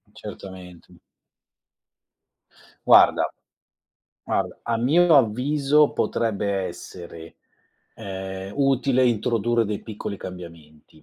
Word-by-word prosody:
Certamente. 90 -3 -11 1.9
Guarda - - +6 0.9
guarda, - - -2
a 115 - 0
mio 155 +7 +4
avviso 140 +5 +2
potrebbe 105 -3 -1 0.2
essere, 85 -1 -10 0.6
ehm, 95 0 -7
utile 135 -2 +2
introdurre 120 0 +1
dei 105 0 -4
piccoli 105 -2 -6
cambiamenti. 80 -4 -12
105 Hz, 75 wpm, -23 LUFS, 95-130 Hz, 1.9 s, Guarda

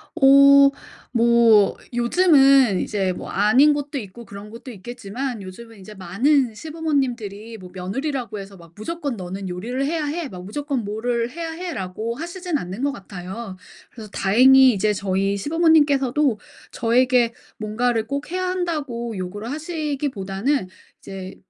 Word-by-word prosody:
어 275 -1 +7 0.4
뭐 230 -3 +4 0.2
요즘은 270 - +4
이제 195 -3 -1
뭐 - - -8
아닌 225 +9 +4
곳도 290 0 -4
있고 230 0 -8
그런 200 +1 -10
곳도 235 +4 -10
있겠지만 240 +3 -6
요즘은 220 +4 -11
이제 210 +3 -11
많은 225 - +1
시부모님들이 245 -7 -3
뭐 185 -3 -12
며느리라고 235 +4 -4
해서 195 0 -10
막 170 -2 -16
무조건 285 +3 -4
'너는 190 +1 -6
요리를 235 +10 -3
해야 310 +1 -1
해.' 310 +2 -3
막 180 -2 -9
무조건 275 +3 -3
'뭐를 230 +3 -2
해야 330 +1 -5
해.'라고 230 - -5
하시진 345 +2 -4
않는 190 -1 -6
것 285 - +1
같아요. 190 +1 -8 0.4
그래서 220 -3 -11
다행히 260 +6 +6
이제 210 +1 +1
저희 195 0 -1
시부모님께서도 290 - +2 0.3
저에게 240 0 +2 0.2
뭔가를 220 +1 -1
꼭 280 +5 -4
해야 370 0 -1
한다고 295 - -3
요구를 200 +5 -6
하시기보다는 285 - -2 0.3
이제 190 -1 -9
235 Hz, 320 characters per minute, -22 LUFS, 200-285 Hz, 0.4 s, 어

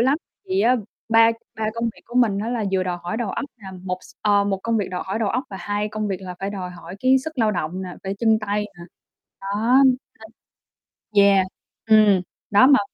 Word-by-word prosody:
lắm, 265 +5 +3 0.3
thì 380 +1 +1
á 255 -5 +4 0.3
ba 225 0 +6 0.2
ba 220 - -3
công 230 0 -2
việc 230 - -3
của 240 - -13
mình 230 -6 +3
á 215 +3 -2
là 235 -3 -1
vừa 190 -1 +2
đòi 180 -1 -2
hỏi 175 +5 -3
đầu 225 -4 -2
óc - - -3
nè, 205 -5 -11
một 180 -1 -3
s - - -16
ơ, 205 -1 +4
1 200 -1 0
công 230 0 0
việc 200 -4 -1
đòi 180 - -3
hỏi 195 +3 -2
đầu 220 -3 0
óc 250 +7 -1
và 195 - -6
2 205 +1 -2
công 215 0 -3
việc 195 - -1
là 185 -1 -7
phải 195 +1 -2
đòi 185 -3 -5
hỏi 180 +1 -10
cái 260 +1 +5
sức 315 -4 -6
lao 220 -2 +3
động 180 -1 -3
nè, 185 - -5
phải 195 0 -3
chân 220 -1 +3
tay 210 0 -1
nè. 170 - -9 0.6
Đó. 215 +6 +2 1.4
Nên 200 - +6
yeah. 195 -2 +4 0.4
Ừm. 210 -4 +6 0.3
Đó 205 +5 +7
mà 280 -1 +6
210 Hz, 230 wpm, -22 LUFS, 195-230 Hz, 1.4 s, Đó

